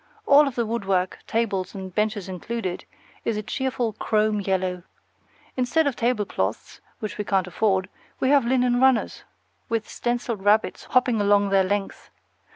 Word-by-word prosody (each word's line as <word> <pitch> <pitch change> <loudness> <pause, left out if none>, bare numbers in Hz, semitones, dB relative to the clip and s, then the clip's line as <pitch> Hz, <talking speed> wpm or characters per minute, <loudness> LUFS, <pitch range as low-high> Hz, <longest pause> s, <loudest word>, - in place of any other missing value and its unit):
All 285 +1 +6
of 270 - -4
the 235 - 0
woodwork 195 -5 -1
tables 205 -4 -1
and 190 -2 -7
benches 210 -2 -1
included 190 0 -4 0.4
is 225 - -1
a 210 - -3
cheerful 250 -2 -2
chrome 215 0 +1
yellow. 185 -2 -1 0.7
Instead 260 +6 +1
of 280 -3 0
tablecloths, 210 - -2 0.2
which 215 -1 -6
we - - 0
can't 195 -2 +1
afford, 190 +1 0 0.3
we 260 - +1
have 280 -2 +5
linen 245 0 +2
runners, 265 -3 +2 0.4
with 225 -2 -1
stenciled 240 -4 -3
rabbits 210 +2 +2
hopping 245 -4 +2
along 205 0 +3
their 195 -1 +4
length. 200 +1 -3
215 Hz, 150 wpm, -24 LUFS, 195-240 Hz, 0.7 s, All